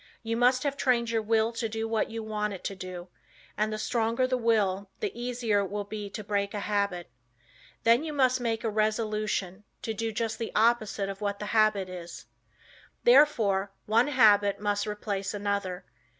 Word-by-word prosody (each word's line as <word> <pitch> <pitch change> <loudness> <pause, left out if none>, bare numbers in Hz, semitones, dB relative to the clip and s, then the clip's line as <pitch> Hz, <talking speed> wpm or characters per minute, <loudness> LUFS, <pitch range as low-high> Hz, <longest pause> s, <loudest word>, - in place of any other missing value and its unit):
You 230 0 -2
must 250 +2 +3
have 285 -1 -1
trained 240 -4 +1
your 225 -1 +1
will 220 +1 +2
to 230 -1 -3
do 225 +1 -3
what 225 -1 0
you 225 0 -5
want 210 -1 -2
it 190 - -9
to 195 - -4
do, 185 -1 -8 0.5
and 215 +1 0
the 215 - -3
stronger 230 +3 0
the 255 0 0
will 205 -5 +1
the 425 -2 -2
easier 240 -3 -1
it 200 -2 -2
will 205 0 -3
be 205 0 -6
to 215 - -7
break 200 0 -1
a 205 - -2
habit. 200 -7 -1 0.7
Then 235 +5 +4
you 320 - -4
must 255 -3 +2
make 230 -2 -1
a 225 - 0
resolution 215 -3 -1 0.2
to 225 -3 -2
do 225 +1 -2
just 225 +1 -3
the 230 - -3
opposite 215 -3 +2
of 195 +1 -6
what 200 -1 -1
the 210 - -6
habit 215 -3 +3
is. 175 -2 -9 0.8
Therefore 215 - +4
one 230 +5 +3
habit 205 -7 +4
must 205 0 -1
replace 205 -1 -3
another. 200 -3 -2
215 Hz, 185 wpm, -28 LUFS, 200-230 Hz, 0.8 s, Then